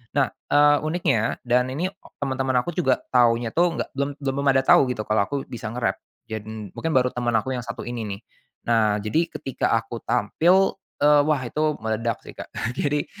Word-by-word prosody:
Nah, 140 Hz, -3 st, +3 dB, 0.2 s
eee, 145 Hz, 0 st, +6 dB
uniknya 155 Hz, -9 st, 0 dB
dan 125 Hz, +1 st, +3 dB
ini 165 Hz, +8 st, -1 dB, 0.3 s
temen-temen 130 Hz, -1 st, -1 dB
aku 175 Hz, +3 st, -6 dB
juga 135 Hz, -8 st, +2 dB
taunya 120 Hz, -2 st, +4 dB
tuh 170 Hz, 0 st, +2 dB
nggak -, -, -3 dB
belum 140 Hz, +1 st, 0 dB
belum 140 Hz, 0 st, -2 dB
pada 135 Hz, 0 st, +3 dB
tahu -, -, +8 dB
gitu, 110 Hz, -, -3 dB
kalo 110 Hz, 0 st, +2 dB
aku 145 Hz, -, -4 dB
bisa 115 Hz, -2 st, -6 dB
nge-rap. 120 Hz, +1 st, -1 dB, 0.3 s
Jad 110 Hz, -2 st, -5 dB
n 110 Hz, -3 st, -8 dB
mungkin 165 Hz, -, -2 dB
baru 125 Hz, -1 st, +3 dB
teman 120 Hz, -1 st, -1 dB
aku 130 Hz, +4 st, -4 dB
yang 120 Hz, -, -3 dB
satu -, -, -6 dB
ini 120 Hz, -1 st, -4 dB
nih. 100 Hz, +1 st, -6 dB, 0.4 s
Nah, 110 Hz, -3 st, +3 dB
jadi 155 Hz, +12 st, 0 dB
ketika 135 Hz, -, -3 dB
aku 115 Hz, 0 st, -5 dB
tampil, 175 Hz, -, +2 dB, 0.2 s
eee, 145 Hz, 0 st, +5 dB
wah, 150 Hz, 0 st, +2 dB
itu 150 Hz, +4 st, -1 dB
meledak 110 Hz, +1 st, -2 dB
sih -, -, -10 dB
Kak. -, -, -9 dB, 0.2 s
Jadi, 145 Hz, +2 st, 0 dB
130 Hz, 190 wpm, -24 LUFS, 115-145 Hz, 0.4 s, tahu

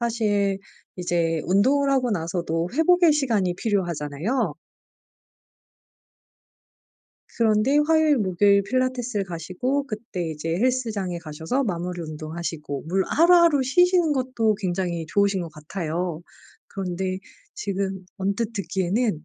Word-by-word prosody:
사실 205 Hz, -4 st, +1 dB, 0.4 s
이제 170 Hz, -2 st, 0 dB
운동을 265 Hz, +10 st, +3 dB
하고 260 Hz, -3 st, +2 dB
나서도 170 Hz, -2 st, -2 dB
회복의 340 Hz, +1 st, +5 dB
시간이 225 Hz, -11 st, +1 dB
필요하잖아요. 175 Hz, -, -1 dB, 2.8 s
그런데 225 Hz, +5 st, +3 dB
화요일, 315 Hz, -2 st, +4 dB
목요일 200 Hz, +1 st, +3 dB
필라테스를 250 Hz, -2 st, -1 dB
가시고 185 Hz, -, -2 dB
그때 215 Hz, -7 st, -5 dB
이제 155 Hz, +1 st, -4 dB
헬스장에 220 Hz, -7 st, -1 dB
가셔서 160 Hz, -, -2 dB
마무리 180 Hz, -3 st, -3 dB
운동하시고 155 Hz, -2 st, -5 dB
물 190 Hz, +3 st, +1 dB
하루하루 335 Hz, -3 st, +5 dB
쉬시는 350 Hz, +3 st, +3 dB
것도 255 Hz, -5 st, +1 dB
굉장히 175 Hz, -4 st, -2 dB
좋으신 200 Hz, +1 st, +2 dB
것 165 Hz, -, -6 dB
같아요. 165 Hz, +1 st, -4 dB, 0.5 s
그런데 185 Hz, 0 st, -3 dB, 0.4 s
지금 195 Hz, -1 st, -3 dB
언뜻 200 Hz, +4 st, -1 dB
듣기에는 195 Hz, -2 st, -1 dB
195 Hz, 285 characters per minute, -24 LUFS, 175-250 Hz, 2.8 s, 회복의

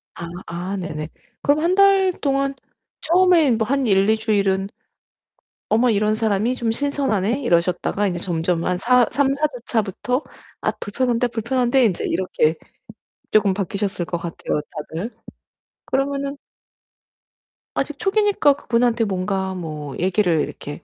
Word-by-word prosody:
아 170 Hz, -, -6 dB, 0.2 s
아 180 Hz, +3 st, -4 dB
네네. 155 Hz, -3 st, -5 dB, 0.3 s
그럼 290 Hz, +1 st, +3 dB
1 350 Hz, +3 st, +2 dB
달 390 Hz, -1 st, +5 dB
동안 275 Hz, -1 st, +1 dB, 0.5 s
처음에 340 Hz, -4 st, +4 dB
뭐 220 Hz, -1 st, +1 dB
한 275 Hz, -2 st, +1 dB
1-2 200 Hz, +2 st, +3 dB
주일은 200 Hz, -3 st, +1 dB, 1.0 s
'어머 235 Hz, +3 st, +4 dB
이런 215 Hz, 0 st, +2 dB
사람이 220 Hz, +2 st, 0 dB
좀 235 Hz, -2 st, -2 dB
신선하네.' 270 Hz, -5 st, 0 dB
이러셨다가 180 Hz, 0 st, +1 dB
이제 175 Hz, -2 st, -2 dB
점점 170 Hz, -1 st, -1 dB
한 180 Hz, 0 st, 0 dB
사 245 Hz, +4 st, +4 dB
3-4 280 Hz, +2 st, +1 dB
주차부터 235 Hz, +3 st, -1 dB, 0.4 s
'아 -, -, 0 dB
불편한데, 245 Hz, +3 st, -1 dB
불편한데.' 245 Hz, +2 st, +1 dB
인제 190 Hz, -5 st, 0 dB
이렇게 165 Hz, -3 st, +1 dB, 0.8 s
쪼금 205 Hz, -3 st, +4 dB
바뀌셨을 195 Hz, -1 st, -2 dB
것 175 Hz, -, -3 dB
같아요 165 Hz, -3 st, -3 dB, 0.4 s
다들. 220 Hz, +8 st, -4 dB, 0.7 s
그러면은 275 Hz, +1 st, -1 dB, 1.4 s
아직 -, -, -2 dB
초기니까 410 Hz, -8 st, +3 dB
그분한테 235 Hz, -3 st, +1 dB
뭔가 190 Hz, 0 st, -2 dB
뭐 155 Hz, -5 st, -6 dB
얘기를 180 Hz, -3 st, +2 dB
이렇게 145 Hz, 0 st, -6 dB
220 Hz, 270 characters per minute, -21 LUFS, 185-270 Hz, 1.4 s, 달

